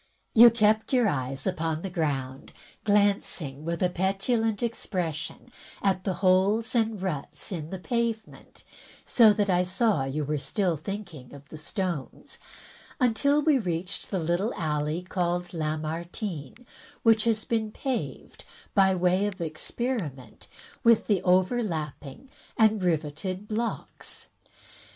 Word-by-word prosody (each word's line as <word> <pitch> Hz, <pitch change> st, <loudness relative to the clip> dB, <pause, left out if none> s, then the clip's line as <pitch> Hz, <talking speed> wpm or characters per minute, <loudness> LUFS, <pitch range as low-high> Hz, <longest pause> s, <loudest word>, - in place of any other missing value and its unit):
"You 235 Hz, +1 st, +10 dB
kept 220 Hz, +1 st, +2 dB
your 245 Hz, -3 st, +4 dB
eyes 135 Hz, -4 st, -2 dB
upon 160 Hz, 0 st, -1 dB
the 195 Hz, -, -3 dB
ground 135 Hz, -6 st, -3 dB, 0.2 s
— -, -, -29 dB
glancing, 200 Hz, -8 st, +1 dB
with 170 Hz, +2 st, -2 dB
a 180 Hz, -, +3 dB
petulant 200 Hz, +5 st, 0 dB
expression, 180 Hz, -3 st, -3 dB, 0.3 s
at 190 Hz, -2 st, +1 dB
the 190 Hz, -3 st, 0 dB
holes 200 Hz, +5 st, +3 dB
and 225 Hz, -3 st, +1 dB
ruts 150 Hz, -5 st, -4 dB
in 160 Hz, -4 st, -4 dB
the 190 Hz, -, -4 dB
pavement 230 Hz, +2 st, -3 dB, 0.4 s
(so 225 Hz, -3 st, +6 dB
that 205 Hz, 0 st, 0 dB
I 180 Hz, -2 st, +3 dB
saw 185 Hz, -, +1 dB
you 145 Hz, +3 st, -2 dB
were 150 Hz, +1 st, -1 dB
still 180 Hz, +3 st, 0 dB
thinking 160 Hz, -5 st, -7 dB
of 140 Hz, +1 st, -14 dB
the 155 Hz, -, -9 dB
stones), 170 Hz, -2 st, -4 dB, 0.6 s
until 280 Hz, +4 st, +3 dB
we 300 Hz, -3 st, +4 dB
reached 180 Hz, -1 st, -3 dB
the 195 Hz, -, -1 dB
little 175 Hz, +6 st, 0 dB
alley 155 Hz, +1 st, -1 dB
called 175 Hz, -1 st, -2 dB
Lamartine, 160 Hz, -, -4 dB, 0.4 s
which 225 Hz, -1 st, +5 dB
has 220 Hz, -2 st, +1 dB
been 220 Hz, -2 st, -1 dB
paved, 260 Hz, +2 st, -4 dB, 0.3 s
by 190 Hz, -2 st, +4 dB
way 185 Hz, +3 st, +2 dB
of 200 Hz, -2 st, -6 dB
experiment 160 Hz, -, -4 dB, 0.4 s
with 230 Hz, -2 st, +5 dB
the 205 Hz, -4 st, +2 dB
overlapping 180 Hz, -, -1 dB, 0.3 s
and 220 Hz, -3 st, +4 dB
riveted 180 Hz, +4 st, -2 dB
blocks. 225 Hz, +2 st, -4 dB
185 Hz, 130 wpm, -27 LUFS, 160-220 Hz, 0.6 s, You